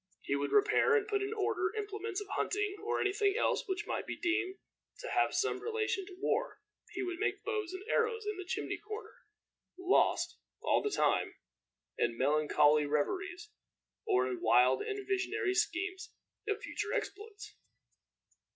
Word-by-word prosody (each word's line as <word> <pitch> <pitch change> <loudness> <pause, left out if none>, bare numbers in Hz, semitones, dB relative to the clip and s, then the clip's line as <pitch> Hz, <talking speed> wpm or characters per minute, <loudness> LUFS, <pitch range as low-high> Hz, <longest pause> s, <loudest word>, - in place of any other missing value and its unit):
He 140 - 0
would 140 0 -1
repair 420 +2 +4
and 430 -1 +2
put 410 -2 0
in 400 +1 -2
order 410 -2 0
implements 415 -1 -3
of 410 - -7
hunting, 415 -1 -1
or 445 +2 0
any 395 - +1
thing 405 -1 +2
else - - +1
which 380 -1 -2
might - - -3
be - - -3
deemed 360 +2 0 0.4
to - - -6
have - - +2
some - - +1
relation 435 -4 -1
to 375 - -10
war. 460 +4 0 0.3
He 390 - -4
would 360 -1 -4
make 430 - -1
bows 430 -6 -2
and 375 +1 -6
arrows 455 -1 +1
in 420 0 -2
the 375 - -5
chimney 380 +3 -3
corner 425 +2 -7 0.6
lost, 370 0 +2 0.2
all - - +2
the 420 - 0
time, - - +1 0.6
in 115 - +1
melancholy 150 +1 +4
reveries, 370 - -1 0.6
or 125 +1 +3
in 125 -1 -4
wild 125 +3 +5
and 405 -1 -4
visionary 390 0 0
schemes 375 +1 -1 0.4
of 415 0 0
future 425 -3 -3
exploits. 425 -3 -5
400 Hz, 160 wpm, -33 LUFS, 360-425 Hz, 0.6 s, wild